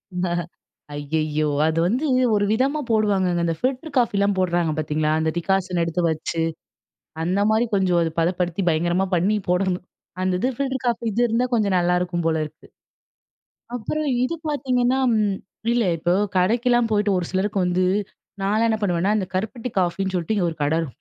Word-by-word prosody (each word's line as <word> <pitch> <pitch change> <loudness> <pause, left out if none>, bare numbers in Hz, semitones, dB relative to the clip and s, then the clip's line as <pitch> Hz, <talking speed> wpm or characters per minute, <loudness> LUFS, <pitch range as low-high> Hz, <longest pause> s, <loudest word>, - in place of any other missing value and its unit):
இந்த 180 0 0 0.7
ஐயயோ! 155 +1 -1 0.2
அது 160 +1 0
வந்து 255 +10 0 0.3
ஒரு 205 0 +2
விதமா 270 +7 +1
போடுவாங்கங்க. 195 -5 +2
அந்த 165 -1 0
ஃபில்டர் 270 +4 -2
காஃபிலாம் 200 -4 +2
போடுறாங்க, 175 -3 +1
பாத்தீங்களா? 155 0 0
அந்த 160 0 +1
டிகாசன் 185 -1 0
எடுத்து 165 +2 -1
வச்சு, 160 +1 -2 0.8
அந்த 185 +4 0
மாரி 220 +2 +3
கொஞ்சம் 185 -3 +2
அது 165 -1 0
பதப்படுத்தி, 175 +2 0
பயங்கரமா 175 +4 +1
பண்ணி 195 +5 +2
போடணும். 180 0 0 0.4
அந்த 185 0 +1
இது 250 - +1
ஃபில்டர் 265 -2 -2
காஃபி 235 -1 0
இது 235 - 0
இருந்தா, 235 +3 +1
கொஞ்சம் 205 -5 +2
நல்லாயிருக்கும் 175 0 0
போல 160 -1 +1
இருக்கு. 150 - -14 1.1
அப்புறம் 295 +7 -2 0.2
இது 335 +6 -1
பாத்தீங்கன்னா 255 -3 +1 0.2
ம் 205 -3 +1 0.4
இல்ல, 235 -4 +2
இப்போ 175 +2 +1 0.2
கடைக்கெல்லாம் 235 +4 +2
போயிட்டு, 205 -1 +2
ஒரு 175 - -3
சிலருக்கு 195 +1 0
வந்து 180 +1 +1 0.6
நான்லாம் 215 +4 +2
என்ன 220 - +1
பண்ணுவேன்னா, 185 0 +1
இந்த 195 - -1
கருப்பட்டி 225 +5 -3
காஃபின்னு 190 +2 -1
சொல்ட்டு, 175 +5 -1
இங்கே 175 -3 +1
ஒரு 160 - -10
கடைரு 160 +2 +1
190 Hz, 155 wpm, -23 LUFS, 175-225 Hz, 1.1 s, மாரி